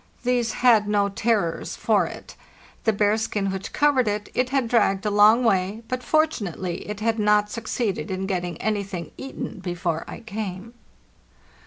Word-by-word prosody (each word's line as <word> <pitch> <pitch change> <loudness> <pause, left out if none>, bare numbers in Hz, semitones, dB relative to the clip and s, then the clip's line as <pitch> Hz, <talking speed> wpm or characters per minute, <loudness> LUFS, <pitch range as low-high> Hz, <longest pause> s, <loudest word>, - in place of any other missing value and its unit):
These 240 -2 +1
had 220 -4 +6
no 205 -1 +2
terrors 200 -4 -1
for - - +2
it. - - -10 0.5
The 220 - +5
bearskin 205 -1 0
which 190 0 -5
covered 285 -5 +3
it, 205 0 -2
it 250 0 +1
had 270 -3 +1
dragged 215 -4 +2
a 210 - +1
long 210 +4 +6
way, 200 0 +1
but 255 0 -3
fort 310 +3 +3
unately 180 -2 -4
it 210 0 -5
had 225 0 0
not 210 0 +3
succeeded 220 -7 -2
in 190 0 -2
getting 180 -3 -2
anything 200 -4 -3
eaten 265 -5 -6
before 175 -3 -2
I - - -8
came. 215 -1 -6
210 Hz, 160 wpm, -24 LUFS, 195-230 Hz, 0.5 s, had